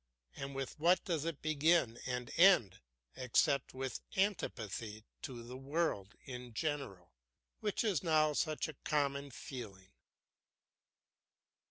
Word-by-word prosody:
And 135 0 -5
with 135 +2 -4
what 175 +4 +4
does 165 -4 -1
it 165 -3 -4
begin 155 -5 +3
and 125 -1 -3
end 175 - +6 0.4
except 130 +2 +2
with 130 0 -3 0.2
antipathy 110 - -1 0.2
to 125 -5 -6
the 125 +2 -8
world 135 - -1
in 125 -3 -7
general, 120 - -3 0.5
which 210 +1 0
is 205 -7 +1
now 155 -3 +3
such 155 +2 0
a 155 - -6
common 140 -1 0
feeling? 105 -5 -8
140 Hz, 120 wpm, -35 LUFS, 120-155 Hz, 0.5 s, end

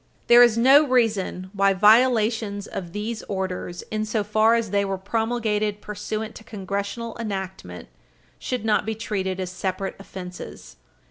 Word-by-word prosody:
There 240 0 +7
is 240 -2 +6
no 270 +5 +7
reason 215 -8 0
why 195 -1 +3
violations 220 -1 +3
of 175 -5 -6
these 215 +3 -4
orders, 185 -2 -4
insofar 215 +1 +2
as 230 -4 -1
they 200 0 +2
were 195 -1 -2
promulgated 215 0 -1
pursuant 215 +1 -5
to - - -13
Congressional 200 +3 -5
enactment, 190 - -6 0.5
should 250 -4 -3
not 215 - +2
be 220 0 -3
treated 190 -3 -3
as 185 -1 -3
separate 190 +1 -3
offenses. 180 -2 -9
210 Hz, 135 wpm, -24 LUFS, 190-225 Hz, 0.5 s, There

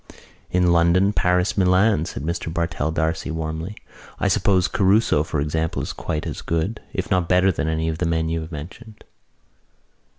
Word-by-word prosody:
"In 90 -1 +2
London, 85 +4 +3
Paris, 90 0 +1
Milan," 95 -2 +3
said 70 - -6
Mr 85 0 -3
Bartell 85 -2 -1
D'Arcy 80 0 -1
warmly. 80 +4 -4 0.4
"I - - +1
suppose 95 -3 +2
Caruso, 100 -3 +3
for 80 -1 -3
example, 80 +2 -1
is - - -5
quite 75 - -4
as - - -5
good, 85 +7 -2
if - - -4
not 90 -2 +1
better 90 +1 +4
than 80 - -2
any 80 0 -1
of 80 0 -3
the 90 - 0
men 80 -1 0
you 80 0 -1
have 80 +2 -8
mentioned." 105 +9 -10
85 Hz, 170 wpm, -22 LUFS, 80-90 Hz, 0.4 s, better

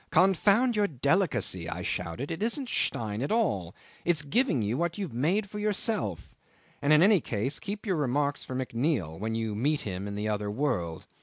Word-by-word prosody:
"Confound 200 +7 +4
your 205 -1 +3
delicacy!" 135 - +1
I - - -4
shouted. 90 - -3
"It 165 - -4
isn't 240 +4 0
Stein 110 -1 -1
at 140 - -2
all. 125 - 0 0.3
It's 165 -4 +1
giving 160 - +2
you 105 +3 -1
what 170 +3 -1
you 200 - -2
had 160 - -10
made 180 - +1
for 210 +1 -7
yourself. 210 - 0 0.5
And 145 +1 +2
in 155 +2 +7
any 200 -3 +5
case 120 +6 -1
keep 205 +2 -5
your 190 -5 0
remarks 145 0 0
for 130 - -6
McNeil 120 - -1
when 110 +2 -2
you 110 -1 -2
meet 145 +8 0
him 95 0 -4
in 100 - -5
the 105 +1 -2
other 105 -1 -1
world. 95 - -2
145 Hz, 190 wpm, -28 LUFS, -, 0.5 s, in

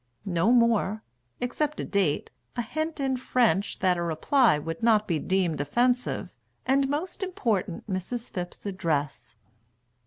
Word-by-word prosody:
No 185 +3 +2
more 225 -3 +3 0.4
except 295 +5 -1
a - - -2
date, 190 -8 0 0.2
a 240 - -1
hint 315 +7 -3
in 265 -2 0
French 230 -7 +1
That 185 -2 +3
a - - -2
reply 170 - +3
would 165 +2 -5
not 220 -2 +4
be 165 -4 0
deemed 180 -5 0
offensive, 245 - 0 0.3
And, 270 +1 +3
most 320 +9 -3
important, 235 - -1
Mrs. 210 +5 -4
Phipp's 175 +1 -6
address. 150 - -2
210 Hz, 135 wpm, -27 LUFS, 175-250 Hz, 0.4 s, not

